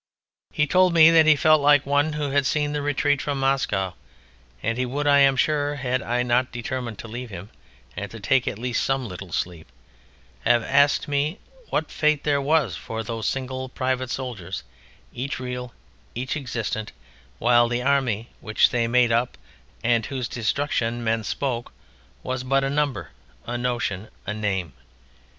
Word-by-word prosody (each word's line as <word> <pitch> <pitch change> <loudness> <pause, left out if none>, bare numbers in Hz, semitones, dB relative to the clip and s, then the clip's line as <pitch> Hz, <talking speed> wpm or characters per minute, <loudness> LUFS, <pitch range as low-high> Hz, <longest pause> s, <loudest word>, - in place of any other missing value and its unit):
He 150 - +2
told 180 +2 +3
me 165 0 +8
that 160 -1 +6
he 155 - +7
felt 155 +1 +4
like 145 -1 +5
one 145 +2 +2
who 150 -2 -2
had 140 -1 +2
seen 145 0 0
the 150 - -1
retreat 145 0 +1
from 145 -2 -2
Moscow, 125 -9 0 0.7
and 115 +1 0
he - - +2
would, 140 +4 -2
I 145 -1 +5
am 135 -1 +5
sure, 145 +1 +1
had 130 -2 -1
I 125 -1 0
not 125 +1 +1
determined 120 -1 -4
to - - -8
leave 120 +2 -6
him 100 +1 -9 0.4
and 100 0 -5
to 115 - -9
take 130 +5 +2
at 105 - -2
least 120 0 -1
some 135 -2 0
little 90 -1 -8
sleep, 85 -1 -3 0.8
have 120 -1 +3
asked 140 +3 +3
me 145 +5 0 0.3
what 155 - -1
fate 150 -1 +1
there 145 -2 +1
was 150 -1 +2
for 110 0 -5
those 115 0 -3
single 130 -1 -3
private 130 0 -2
soldiers, 105 -10 -5 0.5
each 130 +3 -4
real, 125 -1 -5 0.4
each 130 +4 -2
existent, 115 -6 -4 0.4
while 120 0 +4
the 120 +1 -1
Army 125 -5 +1
which 110 - +2
they 120 -1 +1
made 120 0 +3
up 120 +2 0 0.5
and 115 -1 +2
of - - -8
whose 130 -4 -3
"destruction" 120 -1 -1
men 110 0 0
spoke, 120 +1 -3 0.5
was 130 0 -3
but 135 +1 +2
a 135 - 0
number, 145 -2 -1 0.3
a 120 - -4
notion, 120 -5 -2 0.2
a 105 - -2
name. 95 -8 -2
125 Hz, 175 wpm, -24 LUFS, 115-140 Hz, 0.8 s, me